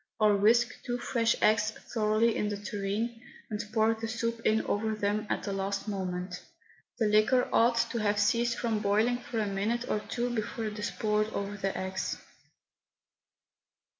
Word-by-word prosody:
Or 210 -1 +5
whisk 235 +4 +3
two 245 0 -2
fresh 230 -1 +1
eggs 215 0 +4 0.2
thoroughly 220 0 +2
in 210 - 0
the 205 - -3
tureen, 205 +3 -3 0.3
and 210 +1 -2
pour 220 0 +3
the 225 0 -5
soup 230 0 -2
in 220 +1 +2
over 220 +1 0
them 210 +1 -1
at - - -1
the 200 - -3
last 195 +1 -2
moment. 180 -2 -3 0.6
The 225 - +1
liquor 215 +5 +4
ought 235 +1 +4
to 235 - -1
have 205 -1 +1
ceased 235 +3 +2
from 225 -3 0
boiling 215 +4 +2
for 245 - -6
a 215 - +1
minute 210 +5 -1
or 215 - 0
two 240 +3 -3
before 225 +1 -3
it 210 0 -4
is 210 - -1
poured 215 0 0
over 200 0 -3
the 195 -1 -2
eggs. 190 0 -3
215 Hz, 170 wpm, -30 LUFS, 205-230 Hz, 0.6 s, Or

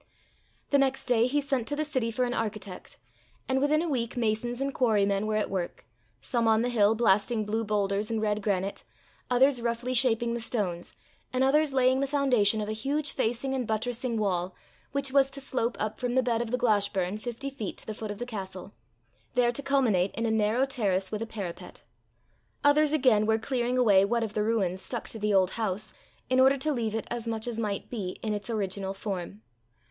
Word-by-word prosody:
The 280 - +5
next 270 -1 +1
day 240 -2 +3
he 290 +3 +1
sent 270 -5 -1
to 290 - 0
the 305 +1 -1
city 260 -6 -1
for 250 +2 0
an 245 - -2
architect; 215 -4 -5 0.5
and 265 0 +1
within 305 +3 +2
a - - -2
week 245 -4 -2
masons 235 +1 -1
and 275 0 -1
quarrymen 205 -4 +2
were 215 - 0
at 215 - +1
work, 180 -3 -4 0.3
some 235 - 0
on 220 0 +4
the 245 - 0
hill 220 -2 +3
blasting 215 0 +2
blue 220 +2 -1
boulders 205 0 0
and 225 -1 -1
red 210 -1 0
granite, 195 -1 -1 0.5
others 255 0 +4
roughly 235 +2 -2
shaping 235 -2 +2
the 235 - -2
stones, 195 -7 -3 0.4
and 255 +1 +1
others 295 +2 +3
laying 260 0 +3
the 275 - 0
foundation 250 -7 +2
of 210 - -3
a - - -2
huge 280 +7 -2
facing 245 +2 -1
and 255 -4 -2
buttressing 235 +2 -1
wall, 185 -3 -1 0.4
which 280 -1 -1
was 275 0 +4
to 275 - -4
slope 255 -3 -1
up 215 0 -3
from 245 0 -1
the 260 - +4
bed 235 -2 +1
of 240 - -3
the 250 - 0
Glashburn 205 -4 +1
fifty 245 +4 -5
feet 225 -7 -5
to - - -11
the 215 - -4
foot 215 0 -6
of 205 - -5
the 245 - -4
castle, 190 - -7 0.6
there 245 -1 +3
to 245 - -3
culminate 245 -10 +2
in 230 - -1
a 225 - +1
narrow 220 +4 +2
terrace 200 -8 -1
with 215 0 -3
a 225 - -3
parapet. 195 -6 -7 0.8
Others 290 +1 +4
again 250 -8 +3
were 220 0 +3
clearing 245 +1 -1
away 205 -6 +5
what 230 +3 +1
of 215 -2 -4
the 210 - 0
ruins 200 -4 0
stuck 240 +2 -5
to 225 - -7
the 210 0 0
old 190 -2 +3
house, 210 0 -2 0.3
in 255 0 +2
order 265 +1 +6
to 300 +3 +1
leave 225 -4 -2
it, 225 - -2
as 240 -1 -3
much 225 0 -2
as 230 -2 -3
might 205 -3 -2
be, 200 -7 -4
in 215 -1 -1
its 205 +2 -4
original 195 -3 -2
form. 195 +1 -5
230 Hz, 210 wpm, -28 LUFS, 210-255 Hz, 0.8 s, order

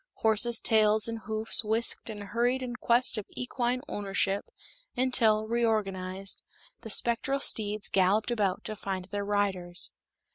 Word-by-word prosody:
Horses' 225 +1 +2
tails 215 -1 +3
and 230 0 -4
hoofs 220 +1 +2
whisked 225 +2 +1
and 205 -2 -6
hurried 240 +5 0
in 245 -1 -5
quest 240 -1 +2
of 205 - -8
equine 250 0 -1
ownership 200 -2 -1 0.5
until, 225 -4 +2
reorganized, 195 -5 -1 0.4
the 225 - -8
spectral 235 +5 +2
steeds 210 -5 0
galloped 195 +5 +2
about 205 -6 0
to 215 - -5
find 190 -2 -4
their 205 0 -2
riders. 195 -4 -1
215 Hz, 135 wpm, -29 LUFS, 200-235 Hz, 0.5 s, tails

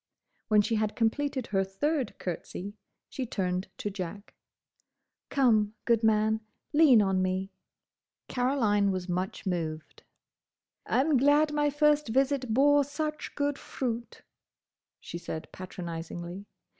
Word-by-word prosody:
When 210 -1 +5
she 225 +1 0
had 215 0 -1
completed 260 +3 0
her 195 -3 +1
third 250 +7 -1
curtsey, 185 +2 -5 0.3
she 260 -2 -5
turned 185 -2 -2
to 205 - -3
Jack. 195 +1 -7 1.0
"Come, 220 -6 +3
good 230 -2 +3
man. 220 0 +3 0.3
Lean 290 -8 +7
on 190 -1 +1
me." 185 +1 -1 0.8
Caroline 235 -6 +2
was 185 -1 -2
much 185 +3 -3
moved. 160 -4 -3 0.9
"I'm 280 +2 +3
glad 295 +3 +4
my 295 0 +2
first 295 0 +3
visit 265 +1 +1
bore 285 +4 +5
such 305 +2 -4
good 285 -1 -1
fruit," 240 -2 -4 0.8
she 170 - -7
said 160 -2 -6
patronisingly. 175 +1 -7
220 Hz, 120 wpm, -29 LUFS, 190-275 Hz, 1.0 s, Lean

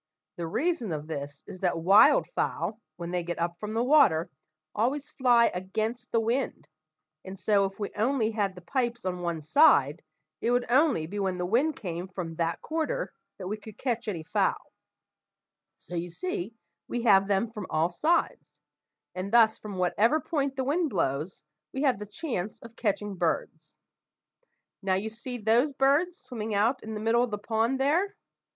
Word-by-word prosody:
The 170 -1 -4
reason 245 - -1
of 150 -1 -3
this 145 -2 -6
is 185 - -10
that 180 -2 0
wild 195 +6 +6
fowl, 220 +1 -2
when 170 0 -6
they 180 -1 0
get 175 0 -4
up 170 0 -2
from 215 +1 -5
the 230 - +2
water, 245 - +4 0.4
always 270 +7 -1
fly 245 -4 +4
against 220 +7 -3
the 230 - +3
wind, 235 +4 -1 0.6
and 190 0 -9
so, 200 -2 +3
if 195 0 -5
we 205 - -3
only 225 +1 +1
had 200 -4 -1
the 180 - -10
pipes 240 +2 -2
on 180 -1 -2
one 170 -3 -3
side, 155 - +5 0.4
it 230 - 0
would 245 0 +2
only 265 - +3
be 200 +6 -5
when 190 -2 -1
the 180 - -2
wind 260 - +2
came 175 -2 -5
from 180 -3 -6
that 165 -1 -1
quarter 320 -1 -2 0.2
that 190 - -7
we 210 +3 -3
could 215 0 -12
catch 235 -3 -2
any 175 -6 -3
fowl; - - -1 1.0
so - - -13
you 175 +1 -3
see 215 - -4 0.3
we 240 -1 -3
have 195 -4 +5
them 205 +3 +1
from 210 -4 -6
all 160 +2 +1
sides; 315 - 0 0.5
and 185 +2 -4
thus 225 -2 +5
from 205 -3 -7
whatever 210 - +2
point 280 -4 -2
the 265 - -1
wind 310 +5 +1
blows, 155 - -2 0.3
we 270 - -2
have 260 -8 +2
the 210 - -7
chance 210 - -4
of 230 -1 -12
catching 205 -2 -1
birds. - - -2 1.1
Now, 190 -2 +1
you 205 +4 -2
see 245 +3 -6
those 235 +6 +2
birds 285 +7 +2
swimming 220 - -5
out 230 +6 +2
in 220 0 -6
the - - -4
middle 225 +2 +2
of 245 - +1
the 210 - -3
pond 225 +5 0
there? 345 +9 +1
215 Hz, 180 wpm, -28 LUFS, 180-250 Hz, 1.1 s, wild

